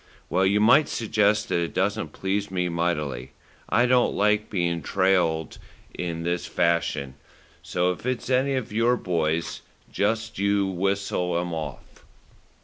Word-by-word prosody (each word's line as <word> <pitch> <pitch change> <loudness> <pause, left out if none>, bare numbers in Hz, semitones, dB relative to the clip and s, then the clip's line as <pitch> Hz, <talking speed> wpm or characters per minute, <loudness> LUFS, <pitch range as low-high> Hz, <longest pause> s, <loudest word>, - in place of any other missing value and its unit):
"Well, 95 +1 +3
you 100 +2 +3
might 130 +8 +5
suggest 105 -2 +1
that - - +1
it 85 -1 -3
doesn't 95 -5 0
please 100 +4 -2
me 90 -1 -1
mightily. 75 -7 -2 0.4
I 120 - +3
don't 125 0 +3
like 105 +1 +2
being 85 -3 -1
trailed 90 -5 +1 0.3
in 85 -2 -4
this 85 +1 -2
fashion, 85 -5 0 0.5
so 90 +1 0
if 90 - -7
it's 130 0 -2
any 130 +2 +2
of 120 -5 -4
your 115 +3 +3
boys 85 -3 -1 0.3
just 110 0 -1
you 100 0 +2
whistle 95 -2 -1
'em 85 0 -2
off." 80 -2 -7
95 Hz, 140 wpm, -25 LUFS, 85-105 Hz, 0.5 s, might